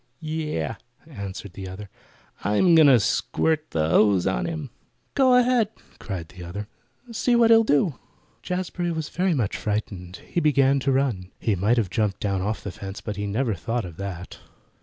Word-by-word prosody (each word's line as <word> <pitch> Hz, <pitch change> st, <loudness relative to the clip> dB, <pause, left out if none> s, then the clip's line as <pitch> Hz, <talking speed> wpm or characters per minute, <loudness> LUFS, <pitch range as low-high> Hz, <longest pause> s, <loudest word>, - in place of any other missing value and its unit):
"Yeh!" 155 Hz, -7 st, -3 dB, 0.3 s
answered 100 Hz, -, -7 dB
the 95 Hz, 0 st, -7 dB
other. 95 Hz, +3 st, -8 dB, 0.6 s
"I'm 135 Hz, -, +3 dB
going 160 Hz, -2 st, +7 dB
to 130 Hz, -4 st, +7 dB
squirt 155 Hz, +8 st, 0 dB
the 80 Hz, -1 st, 0 dB
hose 100 Hz, -1 st, +4 dB
on 95 Hz, 0 st, 0 dB
him!" 160 Hz, -6 st, -5 dB, 0.4 s
"Go 260 Hz, -3 st, +5 dB
ahead!" 250 Hz, -3 st, +3 dB, 0.3 s
cried 90 Hz, -6 st, -6 dB
the 90 Hz, 0 st, -11 dB
other. 100 Hz, +4 st, -6 dB, 0.4 s
"See 240 Hz, +2 st, +1 dB
what 230 Hz, -1 st, +5 dB
he'll 225 Hz, 0 st, +7 dB
do." 145 Hz, -, +1 dB, 0.4 s
Jazbury 180 Hz, -1 st, -2 dB
was 160 Hz, -2 st, -3 dB
very 180 Hz, -1 st, +1 dB
much 115 Hz, -8 st, -1 dB
frightened. 100 Hz, -4 st, -3 dB
He -, -, -1 dB
began 140 Hz, -3 st, +3 dB
to 135 Hz, +1 st, 0 dB
run. 125 Hz, -9 st, 0 dB
He 110 Hz, -, +1 dB
might 105 Hz, +6 st, +2 dB
have 105 Hz, -6 st, 0 dB
jumped 105 Hz, -4 st, 0 dB
down 100 Hz, -2 st, -1 dB
off 105 Hz, +3 st, -2 dB
the 100 Hz, -, -4 dB
fence, 95 Hz, +2 st, -7 dB
but 105 Hz, -, -5 dB
he 100 Hz, +1 st, -3 dB
never 115 Hz, +3 st, 0 dB
thought 115 Hz, +5 st, -3 dB
of 85 Hz, -3 st, -10 dB
that. 95 Hz, -2 st, -6 dB
115 Hz, 180 wpm, -24 LUFS, 95-160 Hz, 0.6 s, going